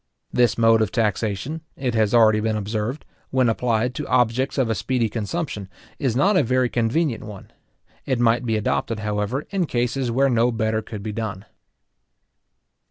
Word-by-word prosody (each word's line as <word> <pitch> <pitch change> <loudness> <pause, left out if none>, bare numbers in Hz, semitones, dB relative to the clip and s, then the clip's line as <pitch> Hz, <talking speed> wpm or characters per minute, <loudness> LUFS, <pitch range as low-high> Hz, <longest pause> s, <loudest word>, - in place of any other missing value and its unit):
This 120 -1 +3
mode 115 -1 +5
of 110 - 0
taxation, 110 - -1
it 130 -3 -2
has 110 -2 +2
already 110 -2 +5
been 110 0 0
observed, 110 +6 -3 0.2
when 130 -2 +2
applied 120 +1 0
to - - -5
objects 125 +3 +1
of 130 -3 +2
a 115 - +1
speedy 120 +3 0
consumption, 105 - -4 0.3
is 130 -6 0
not 195 +11 +3
a - - +5
very 125 +1 +1
convenient 120 +4 0
one. 105 -3 -10 0.6
It 130 -3 0
might 120 0 +3
be 115 -2 0
adopted, 110 +1 -1
however, 105 +6 -2
in 190 -4 0
cases 125 +1 -1
where 135 +4 +3
no 120 -1 +2
better 110 -1 0
could 105 -2 -8
be 110 - -3
done. 105 -3 -5
115 Hz, 165 wpm, -23 LUFS, 110-130 Hz, 0.6 s, mode